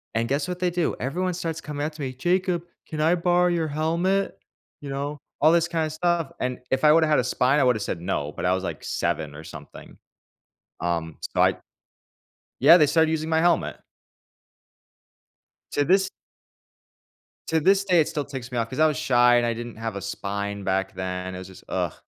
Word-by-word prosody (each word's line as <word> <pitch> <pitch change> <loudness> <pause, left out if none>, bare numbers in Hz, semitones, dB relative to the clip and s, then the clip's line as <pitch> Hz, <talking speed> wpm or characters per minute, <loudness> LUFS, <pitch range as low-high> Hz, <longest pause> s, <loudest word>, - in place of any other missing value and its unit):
And 115 0 +1
guess 140 +2 -1
what 180 0 -4
they 180 -1 +1
do? 175 -1 -1
Everyone 180 +8 -1
starts 165 -2 -4
coming 145 -1 -4
up 155 - -4
to 155 - -9
me, 130 -2 -3
"Jacob, 175 +4 0 0.2
can 155 -1 -4
I 165 +3 +4
borrow 180 +1 +2
your 170 -2 0
helmet?" 170 +6 0 0.4
You 145 - -7
know, 140 +2 -3 0.2
all 155 +2 +6
this 170 0 +3
kinda 165 -2 -1
stuff. 165 -1 0
And 125 -1 -2
if 130 +1 0
I 150 - +7
woulda 160 +1 +5
had 150 - +3
a - - +1
spine, 130 +3 +2
I - - +4
woulda 125 -3 +3
said, 90 -4 -4
"No," 85 -5 -2
but - - -5
I 90 - +3
was, 95 0 -2
like, - - -5
seven 80 -4 -2
or 75 - -9
something, - - -12 0.8
um, 85 -2 -2
so - - -1
I - - +3 1.0
yeah, 170 - +8
they 150 - +5
started 160 +2 +3
using 160 0 -2
my 160 0 +2
helmet. 170 0 +2 2.0
To 145 - +1
this 190 +5 +3 1.4
to 160 - +2
this 195 +4 +3
day, 180 -4 +4
it 150 - 0
still 145 -2 -3
ticks 135 -3 -7
me 125 - -3
off, 115 -1 -1
'cause 130 - -6
I 155 - +6
was 150 -4 -1
shy, 120 -1 +4
and 120 - +2
I 115 - 0
didn't 120 -1 -7
have 115 -2 -4
a 100 - -4
spine 100 +1 -4
back 95 0 0
then, 95 0 -4
it - - -6
was 95 0 -8
just, 95 - -14
ugh. - - -1
145 Hz, 205 wpm, -24 LUFS, 115-165 Hz, 2.0 s, yeah